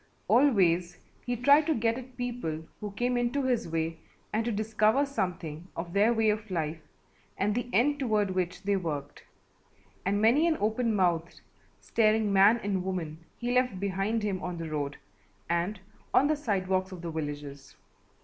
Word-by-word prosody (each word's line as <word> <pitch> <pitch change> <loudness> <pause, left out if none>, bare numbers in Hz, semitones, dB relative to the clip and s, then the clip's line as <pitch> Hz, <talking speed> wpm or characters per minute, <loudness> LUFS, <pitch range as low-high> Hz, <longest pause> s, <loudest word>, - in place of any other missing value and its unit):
Always 180 -10 +3 0.3
he 245 - 0
tried 285 +5 +5
to 320 - +2
get 230 -1 +1
at 255 0 -10
people 235 -11 -3
who 210 - -4
came 245 +3 0
into 245 +4 0
his 250 -7 0
way 165 0 -2 0.3
and 220 +1 +1
to 235 - -1
discover 215 +5 +2
something 180 - -4
of 170 0 -5
their 205 +4 +4
way 225 -2 +3
of 215 0 -4
life 160 -3 -2 0.6
and 205 +2 +1
the 245 +2 -2
end 285 +5 +2
toward 215 -7 +1
which 180 0 -2
they 200 0 +1
worked, 150 -6 -4 0.8
and 200 +2 +1
many 245 +10 +4
an 320 -2 +2
open 220 +2 +1
mouthed, 170 -3 0 0.4
staring 215 -2 +2
man 200 +4 +6
and 195 -2 -1
woman 170 -5 -4 0.2
he 240 0 -2
left 250 -6 +1
behind 200 +3 -1
him 195 -3 -1
on 180 -1 -4
the 165 -1 -5
road 145 -1 -3 0.5
and 175 +4 -1 0.4
on 275 - +6
the 310 +1 +2
sidewalks 190 -7 -1
of 180 -2 -9
the 170 - -4
villages. 145 -3 -6
205 Hz, 170 wpm, -29 LUFS, 175-240 Hz, 0.8 s, man